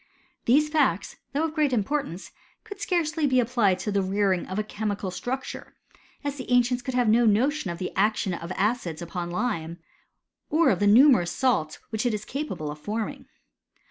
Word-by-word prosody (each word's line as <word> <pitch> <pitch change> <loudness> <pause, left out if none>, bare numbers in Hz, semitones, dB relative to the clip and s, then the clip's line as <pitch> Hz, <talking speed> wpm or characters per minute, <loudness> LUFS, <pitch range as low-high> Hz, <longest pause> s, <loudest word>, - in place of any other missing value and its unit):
These 290 +6 +4
facts, 280 - +1
though 290 +3 0
of 320 -1 -1
great 305 -3 +2
importance^ 200 - -2 0.3
could 405 - -10
scarcely 320 -4 0
be 255 -2 +3
applied 230 -6 +2
to 210 - -2
the 200 0 +1
rearing 190 -1 0
of 185 - -5
a 215 - +1
chemi 205 -3 -3
structure, 265 +7 -5 0.5
us 285 0 -2
the 255 - -7
ancients 245 0 +3
could 255 +1 -4
have 245 -2 +2
no 230 +2 +4
notion 250 +3 +2
of 170 0 -5 0.2
action 205 -2 +1
of 170 +1 -6
acids 190 -6 -1
upon 175 0 -5
lime, 175 -5 -2 0.7
or 310 -2 +4
of 185 - 0
the 205 - +2
numerous 220 -5 +6
sal 245 - +1 0.2
which 220 +2 0
it 230 - 0
is 210 0 -6
capable 270 - -4
of 150 - -9
forming. 215 +6 -4
220 Hz, 175 wpm, -26 LUFS, 190-265 Hz, 0.7 s, numerous